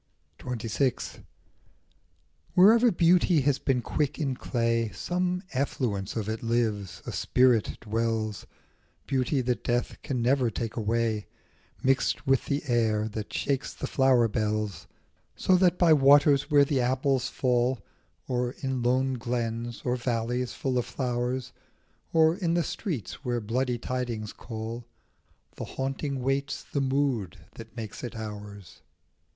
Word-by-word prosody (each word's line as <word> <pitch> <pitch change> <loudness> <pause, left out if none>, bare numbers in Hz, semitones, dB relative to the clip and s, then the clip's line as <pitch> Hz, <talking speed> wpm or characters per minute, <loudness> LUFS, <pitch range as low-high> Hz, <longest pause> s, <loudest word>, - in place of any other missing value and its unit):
29 120 -3 -4
XXVI. 120 +4 -1 1.3
WHEREVER 225 +6 +7
beauty 170 -1 +4
has 135 0 +1
been 125 -3 0
quick 150 +2 -1
in 140 -5 -1
clay 115 -3 0
Some 180 +1 -2
effluence 120 -7 -1
of 110 -3 -2
it 110 0 -3
lives, 110 -5 -1
a - - -4
spirit 125 -3 +2
dwells, 110 -1 -2 0.6
Beauty 135 0 0
that 125 -3 -1
death 120 0 -1
can 130 -3 -2
never 125 +1 +2
take 115 0 -4
away 110 -1 0 0.6
Mixed 135 +2 +1
with 135 -2 +2
the 140 +1 -1
air 110 -3 +2
that 105 -1 -6
shakes 140 -2 -2
the - - -4
flower 130 -3 +3
bells; 105 -2 -2 0.5
So 185 - +3
that 180 -1 +3
by 170 -3 +6
waters 140 0 +5
where 145 -2 +6
the 135 -2 +1
apples 130 +1 +1
fall, 125 -2 0 0.4
Or 125 -1 -1
in 130 -3 -3
lone 130 +1 +1
glens, 120 0 -3
or 125 0 +1
valleys 120 0 -1
full 130 -2 -1
of 120 - -2
flowers, 125 0 -2 0.6
Or 160 0 +4
in 170 -4 0
the 170 - +2
streets 150 - -4
where 120 -2 -1
bloody 120 +3 -1
tidings 120 -3 -3
call, 115 +1 -7 0.7
The - - -4
haunting 135 0 -3
waits 135 +1 -1
the 140 - -2
mood 130 -9 0 0.2
that 115 +1 -12
makes 110 -3 -6
it 120 - -5
ours. 105 -4 -8
125 Hz, 135 wpm, -27 LUFS, 115-135 Hz, 1.3 s, WHEREVER